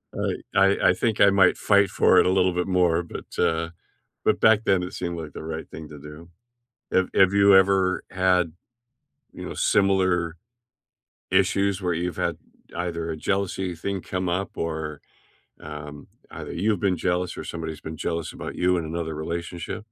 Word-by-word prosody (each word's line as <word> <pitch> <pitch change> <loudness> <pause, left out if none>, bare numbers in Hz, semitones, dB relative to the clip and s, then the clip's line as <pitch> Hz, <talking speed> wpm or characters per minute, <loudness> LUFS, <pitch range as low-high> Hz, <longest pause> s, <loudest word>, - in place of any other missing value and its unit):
I - - -1 0.2
I 95 +1 +4
I - - +5
think 110 +3 -1
I 100 - +8
might 95 -2 +4
fight 100 -2 +3
for - - +4
it - - +4
a - - +3
little 95 -1 +2
bit 90 +1 -1
more, 90 -2 +2
but, 85 - -10
uh, 80 0 +1 0.6
but - - +2
back 110 0 +5
then, 95 -2 +2
it 90 - -6
seemed 85 -1 -4
like 80 -3 -7
the - - -8
right 80 0 -6
thing 80 -1 -9
to 75 -1 -10
do. 75 +4 -12 0.6
Have 95 0 +2
have 95 0 +5
you 100 -1 +6
ever 95 -1 +3
had, 90 -3 +2 0.8
you - - -8
know, - - -6
similar 95 -4 +2 0.9
issues, 100 +1 +2
where 90 -2 0
you've 90 +1 -3
had - - -1 0.4
either 85 -2 -3
a 80 - -3
jealousy 95 0 -2
thing 95 +3 -4
come 90 0 -3
up 95 +3 -2
or, 80 -2 -4 0.6
um, 75 -1 -9 0.2
either - - -7
you 100 +6 0
have 100 - 0
been 95 -3 +1
jealous 90 +1 -1
or - - -6
somebody's 80 -1 -6
been 80 -1 -7
jealous 85 -1 -3
about - - -7
you 90 0 +2
in 85 - -2
another 80 0 -4
relationship? 85 +2 -5
90 Hz, 180 wpm, -24 LUFS, 80-95 Hz, 0.9 s, I